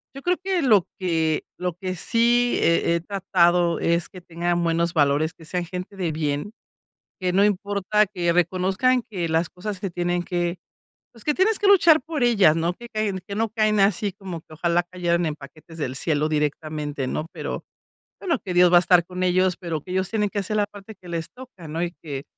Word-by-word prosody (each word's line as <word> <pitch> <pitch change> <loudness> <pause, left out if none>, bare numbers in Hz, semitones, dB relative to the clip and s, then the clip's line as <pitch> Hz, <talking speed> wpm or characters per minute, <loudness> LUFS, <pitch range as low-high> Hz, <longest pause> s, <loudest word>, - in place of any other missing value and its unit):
yo 275 - -8
creo 360 +3 +1
que 375 -2 0
lo 215 -9 +4
que 160 -4 0
lo 180 -1 -2
que 185 0 -4
sí 240 +5 +2
he 170 0 +3
he 170 - -1
tratado 175 -2 +2
es 170 +1 +1
que 185 - -12
tengan 175 0 -1
buenos 170 0 +1
valores, 150 +2 +2
que 165 - -17
sean 175 +2 -2
gente 185 +3 -7
de 175 -4 -1
bien, 150 +6 -2 0.7
que 185 -1 0
no 200 +2 +4
importa 205 +1 +1
que 175 -4 -1
reconozcan 190 +8 +2
que 175 -5 -3
las 160 +1 +1
cosas 200 +1 -6
que 195 0 -3
tienen 175 0 -1
que 175 -1 -2 0.5
pues, 230 -3 -13
que 300 - +2
tienes 400 +3 +2
que 415 - +1
luchar 330 -7 +6
por 310 -3 -3
ellas, 200 -10 +5
no 170 +2 0
que 240 +3 -11
caen 210 -3 -2
que 200 - -5
no 225 +2 0
caen 215 -2 +2
así 200 0 +2
como 185 -4 -7
que - - -19
ojalá 170 +2 +1
cayeran 175 -1 -1
en 155 - -2
paquetes 155 +3 -13
del 130 -4 -3
cielo 155 0 0
directamente, 150 -2 -2
no, 155 - -3
pero - - -5 0.6
bueno 340 -7 0
que 185 - -3
Dios 180 0 +5
va - - +8
a - - +4
estar 175 -1 +4
con 180 0 -5
ellos, 185 0 +2
pero 165 -4 -4
que 180 - -8
ellos 190 +1 -1
tienen 210 -2 0
que 205 - -2
hacer 215 +3 -3
la 205 - +2
parte 205 +1 -12
que 180 - -13
les 165 -1 -4
toca, 250 -11 -12
¿no? 160 +2 -3
Y 175 0 -2
que 140 -3 -6
180 Hz, 210 wpm, -23 LUFS, 170-205 Hz, 0.7 s, va